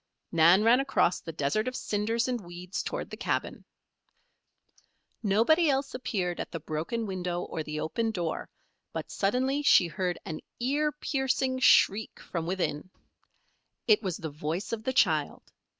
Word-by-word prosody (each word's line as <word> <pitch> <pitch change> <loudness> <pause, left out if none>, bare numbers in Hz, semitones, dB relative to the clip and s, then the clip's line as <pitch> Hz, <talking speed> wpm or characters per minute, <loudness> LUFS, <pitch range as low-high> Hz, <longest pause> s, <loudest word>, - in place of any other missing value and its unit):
Nan 170 +4 +6
ran 235 +3 +6
across 270 -9 +2
the 165 - -7
desert 155 - -1
of 255 - -3
cinders 225 +3 -1
and 245 -3 -2
weeds 175 +2 -5
toward - - -5
the - - -6
cabin. - - -2 1.6
Nobody 235 - +3
else 275 0 0
appeared 190 -8 -2
at - - -4
the 165 - -4
broken 160 +9 -3
window 180 -3 -3
or 160 - -4
the 155 0 -4
open 225 +9 -1
door, 175 -7 -3 0.4
but - - -5
suddenly 260 +8 +1
she 235 -10 +6
heard 175 +2 -2
an 155 - -5 0.2
ear 290 +5 +1
piercing 265 -3 -1
shriek 220 -4 +4
from 165 -2 -4
within. 175 -3 -2 1.0
It 215 -2 +5
was 185 -6 -3
the 160 -2 -6
voice 155 +7 -4
of 225 - -2
the 260 - 0
child. 160 - +2
200 Hz, 150 wpm, -29 LUFS, 170-250 Hz, 1.6 s, Nan